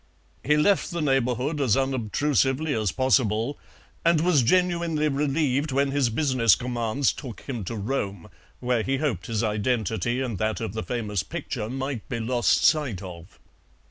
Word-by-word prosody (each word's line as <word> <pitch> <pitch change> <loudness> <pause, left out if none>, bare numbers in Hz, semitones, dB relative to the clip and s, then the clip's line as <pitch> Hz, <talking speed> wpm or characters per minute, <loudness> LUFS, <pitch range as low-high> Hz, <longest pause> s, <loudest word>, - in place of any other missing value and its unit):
He 150 +3 +3
left 190 +6 +3
the 170 -2 -4
neighbourhood 135 0 0
as 125 -5 +3
unobtrusively 135 +3 0
as 110 -6 0
possible, 125 0 +1 0.4
and 170 -1 +4
was 165 -3 +3
genuinely 170 +1 +1
relieved 145 0 0
when 140 +1 +1
his 140 -3 +2
business 125 - +3
commands 120 +2 -1
took 125 -6 -9
him 120 -6 -5
to 115 - -4
Rome, 100 -4 -3 0.3
where 125 -2 0
he 135 +4 -1
hoped 120 - -2
his 115 -1 -1
identity 110 +1 0
and 120 -8 -3
that 110 0 -1
of 110 -4 -4
the 110 - -3
famous 105 -6 -2
picture 120 - -5
might 135 -2 -4
be 115 - -2
lost 120 -2 +1
sight 135 - +2
of. 90 0 -10
125 Hz, 155 wpm, -25 LUFS, 110-145 Hz, 0.4 s, and